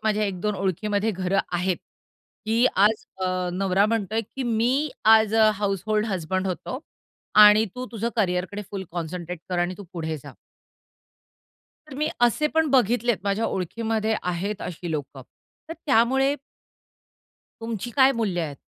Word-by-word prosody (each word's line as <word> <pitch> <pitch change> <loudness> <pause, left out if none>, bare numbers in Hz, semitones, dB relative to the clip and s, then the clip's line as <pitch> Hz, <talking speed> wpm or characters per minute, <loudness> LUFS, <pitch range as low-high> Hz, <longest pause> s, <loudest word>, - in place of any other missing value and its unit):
माझ्या 215 -1 +2
एक 190 -3 -3
दोन 210 +1 -1
ओळखीमध्ये 200 +3 -1
घरं 190 0 -1
आहेत, 180 +1 0 0.7
की 230 +3 +3
आज 210 +3 +3 0.2
अ, 185 -1 -1
नवरा 195 +2 +2
म्हणतोय 220 0 0
की 265 +5 -7
मी 245 +5 +1 0.2
आज 220 0 +6
अ, 220 -1 +6
हाउसहोल्ड 210 +2 -1
हसबंड 185 -1 -2
होतो 190 +7 -4 0.7
आणि 210 +1 +7
तू 255 0 -5
तुझं 230 0 -2
करियरकडे 190 0 -1
फुल 195 -2 -5
कॉन्संट्रेट 175 0 -5
कर 180 -1 -1
आणि 175 +1 0
तू 200 - -8
पुढे 160 -2 -3
जा. - - -12 1.6
तर 285 - -9
मी 305 +2 0
असे 240 +5 +3
पण 320 0 +3
बघितलेत 240 -2 +3
माझ्या 200 +3 0
ओळखीमध्ये 220 +4 -1
आहेत 185 +4 -3
अशी 175 -1 -6
लोकं. 145 -3 -5 0.5
तर - - -4
त्यामुळे 265 +2 +3 1.3
तुमची 225 0 -4
काय 270 0 +6
मूल्य 205 -7 -1
आहेत? 145 -4 -4
210 Hz, 145 wpm, -24 LUFS, 185-225 Hz, 1.6 s, आणि